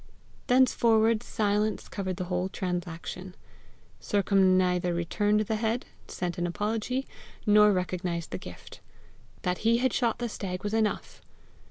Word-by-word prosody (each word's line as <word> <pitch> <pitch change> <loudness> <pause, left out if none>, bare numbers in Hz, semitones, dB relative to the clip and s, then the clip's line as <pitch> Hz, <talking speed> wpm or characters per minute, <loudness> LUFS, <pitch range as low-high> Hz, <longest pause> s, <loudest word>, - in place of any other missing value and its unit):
Thenceforward 230 -3 +4
silence 210 -2 0
covered 185 -3 -4
the - - -2
whole 180 +1 -2
transaction. 180 0 -5 0.6
Sercombe 195 -2 +3
neither 180 -1 +1
returned 205 +5 +1
the 215 +1 -1
head, 225 +2 -1 0.2
sent 175 -1 -4
an 175 - 0
apology, 225 +8 -2 0.4
nor 210 0 +6
recognized 180 -3 -2
the 95 - -4
gift. - - -11 0.6
That 180 0 -1
he 230 +1 +3
had 255 0 +1
shot 235 -3 +1
the 240 - -2
stag 185 -4 -5
was 205 +1 -2
enough! 220 -1 -1
200 Hz, 135 wpm, -28 LUFS, 180-220 Hz, 0.6 s, nor